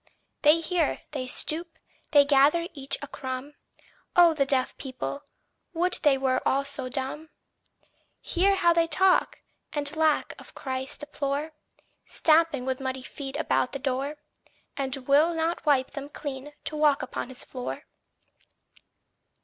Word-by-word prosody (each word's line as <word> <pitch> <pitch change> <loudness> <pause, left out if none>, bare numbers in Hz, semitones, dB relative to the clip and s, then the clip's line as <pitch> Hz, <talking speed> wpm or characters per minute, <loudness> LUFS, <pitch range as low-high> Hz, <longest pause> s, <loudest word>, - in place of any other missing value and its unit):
They 305 +3 +6
hear, 330 -2 0
they 265 -4 -4
stoop, 325 +6 -2 0.3
they 285 -2 +6
gather 290 +4 +4
each 275 -3 -2
a - - -5
crumb. 260 +2 -6 0.6
Oh 345 -2 +7
the 280 -3 +1
deaf 260 -2 +1
people! 270 +2 -5 0.5
would 360 +2 +1
they 290 -3 +4
were 260 -1 +1
also 275 -1 -1
dumb! 275 +4 -4 0.9
Hear 390 +2 +2
how 345 -3 +4
they 335 0 +3
talk, 375 +2 +2 0.3
and 290 0 0
lack 315 -1 +2
of - - -14
Christ 260 +1 -3
deplore, 290 +1 -3 0.5
Stamping 315 -5 +3
with 260 0 -2
muddy 260 -1 -4
feet 270 0 -7
about 305 -4 0
the - - -2
door, 275 +2 -2 0.6
And 270 -1 -1
will 305 +5 +4
not 325 +1 -1
wipe 265 -3 +3
them 280 0 -7
clean 290 -1 -7
to 305 - -4
walk 300 -3 +3
upon 255 - -5
his 260 - -4
floor! 250 -1 -6
285 Hz, 140 wpm, -27 LUFS, 265-320 Hz, 0.9 s, Oh